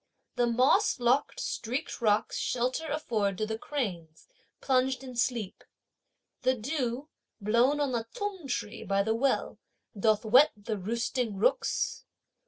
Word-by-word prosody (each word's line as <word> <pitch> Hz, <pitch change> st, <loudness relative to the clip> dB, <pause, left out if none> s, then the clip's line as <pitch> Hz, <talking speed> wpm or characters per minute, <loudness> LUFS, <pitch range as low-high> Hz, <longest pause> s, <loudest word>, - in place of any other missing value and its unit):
The 240 Hz, -, +2 dB
moss 255 Hz, -, +3 dB
locked, 245 Hz, +4 st, +2 dB
streaked 255 Hz, +5 st, -3 dB
rocks 215 Hz, -2 st, +2 dB
shelter 255 Hz, +6 st, -1 dB
afford 220 Hz, -10 st, -1 dB
to 215 Hz, -, 0 dB
the 220 Hz, +1 st, -4 dB
cranes, 180 Hz, -, -4 dB, 0.3 s
plunged 260 Hz, 0 st, +1 dB
in 255 Hz, -2 st, -8 dB
sleep. 235 Hz, -5 st, -1 dB, 0.8 s
The 255 Hz, 0 st, +2 dB
dew, 255 Hz, +2 st, -3 dB, 0.3 s
blown 235 Hz, +7 st, +3 dB
on 285 Hz, -2 st, +1 dB
the 230 Hz, -2 st, -2 dB
t'ung 390 Hz, -, -4 dB
tree 230 Hz, -3 st, -3 dB
by 195 Hz, +1 st, +1 dB
the 220 Hz, +2 st, +1 dB
well, 260 Hz, +4 st, 0 dB, 0.4 s
doth 215 Hz, +1 st, +2 dB
wet 255 Hz, +7 st, +6 dB
the 205 Hz, 0 st, -4 dB
roosting 235 Hz, +2 st, -2 dB
rooks. 195 Hz, -, 0 dB
240 Hz, 135 wpm, -29 LUFS, 215-265 Hz, 0.8 s, wet